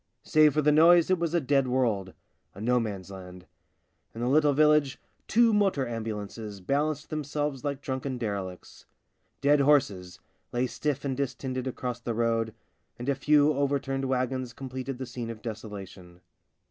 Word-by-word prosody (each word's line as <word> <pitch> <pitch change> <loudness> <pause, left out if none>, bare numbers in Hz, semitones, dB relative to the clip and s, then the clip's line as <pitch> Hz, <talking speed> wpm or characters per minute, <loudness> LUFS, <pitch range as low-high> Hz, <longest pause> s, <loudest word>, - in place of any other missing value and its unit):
Save 155 -2 +4
for 150 - +2
the 150 - +5
noise 170 +3 +6
it 185 - +3
was 170 0 -1
a - - +4
Dead 135 -2 +2
World 115 -7 0 0.2
— - - -43
a - - -10
no 125 +3 +2
man's 100 -4 -5
land. 90 -1 -10 0.7
In 115 - -6
the 120 - 0
little 150 +1 +4
village 150 -1 +3 0.3
two 230 0 +4
motor 195 -11 +2
ambulances 110 -2 -5
balanced 150 - -1
themselves 145 -2 -3
like 140 -2 -3
drunken 130 -1 -3
derelicts. 100 -6 -6 0.5
Dead 145 +1 +4
horses 105 -11 +2 0.3
lay 120 +1 0
stiff 140 +1 -3
and 135 -2 -1
distended 130 -1 -3
across 125 -1 -4
the 120 -1 -4
road, 115 -1 0 0.4
and 120 +3 -4
a - - +3
few 150 +2 +3
overturned 135 -1 -1
wagons 130 -1 -1
completed 130 0 -6
the 130 - -5
scene 120 -1 -6
of 115 -1 -8
desolation. 100 -5 -8
130 Hz, 160 wpm, -28 LUFS, 115-145 Hz, 0.7 s, noise